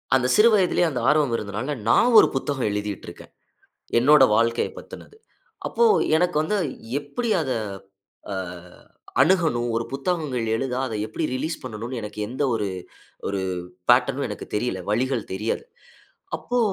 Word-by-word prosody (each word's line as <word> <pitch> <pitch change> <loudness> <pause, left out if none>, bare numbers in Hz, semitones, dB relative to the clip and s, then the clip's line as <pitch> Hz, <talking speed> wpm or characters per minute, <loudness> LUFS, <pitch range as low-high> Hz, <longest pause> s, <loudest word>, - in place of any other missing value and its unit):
அந்த 125 -1 +2
சிறு 225 +2 +7
வயதிலேயே 180 -3 +3
அந்த 125 -5 -3
ஆர்வம் 150 -5 +3
இருந்ததுனால, 105 +8 -4
நான் 245 - +5
ஒரு - - +5
புத்தகம் 135 -3 -1
எழுதிட்டு 105 -1 -4
இருக்கேன். - - -13 0.7
என்னோட 145 +2 +6
வாழ்க்கைய 115 +1 +1
பத்தினது. 435 - -12 0.5
அப்போ 470 - +2 0.3
எனக்கு 175 -2 +1
வந்து 210 +6 0 0.4
எப்படி 220 +11 -3
அத 130 - -3 0.8
அ - - -3 0.9
அணுகணும் 155 -11 +2
ஒரு 115 0 -1
புத்தகங்கள் 140 -4 -2
எழுத 130 +1 -2
அதை 115 -4 -4
எப்படி 165 - -4
ரிலீஸ் 160 +5 -2
பண்ணனும்னு 115 +4 -5
எனக்கு 105 0 -7
எந்த 130 +5 -3
ஒரு 105 -2 -1 0.6
ஒரு 100 -1 -2 0.5
பேட்டர்னும் 130 +3 +2
எனக்கு 105 - -6
தெரியல. 105 -4 -1
வழிகள் 125 +1 0
தெரியாது. 105 +4 -2 0.7
அப்போ 245 0 -2
130 Hz, 135 wpm, -24 LUFS, 115-160 Hz, 0.9 s, சிறு